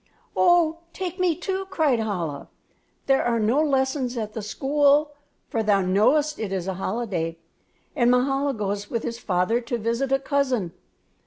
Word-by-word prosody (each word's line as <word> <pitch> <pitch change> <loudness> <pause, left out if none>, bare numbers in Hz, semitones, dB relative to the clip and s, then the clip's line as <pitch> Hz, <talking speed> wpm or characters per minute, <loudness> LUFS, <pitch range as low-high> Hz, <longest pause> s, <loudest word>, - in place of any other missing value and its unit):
"Oh, 340 -2 +4
take 370 0 -5
me, 360 -3 +2
too," 380 +2 -3
cried 310 -10 +2
Chola. 175 -10 -3 0.6
"There 270 -1 +3
are 235 -1 +1
no 230 +7 +2
lessons 265 -3 0
at 215 -2 -4
the 220 - -4
school; 285 +6 +2 0.4
for 225 - -1
thou 205 -2 +3
knowest 250 +12 +2
it 215 -3 -3
is 190 -2 -3
a 190 - -1
holiday, 185 -4 -3 0.6
and 240 -4 +3
Mahala 270 +2 +2
goes 205 -1 -3
with 230 - -2
his 235 0 -4
father 195 +4 0
to 240 0 -3
visit 235 +4 -1
a 270 - +4
cousin. 265 - -1
240 Hz, 160 wpm, -24 LUFS, 210-285 Hz, 0.6 s, Oh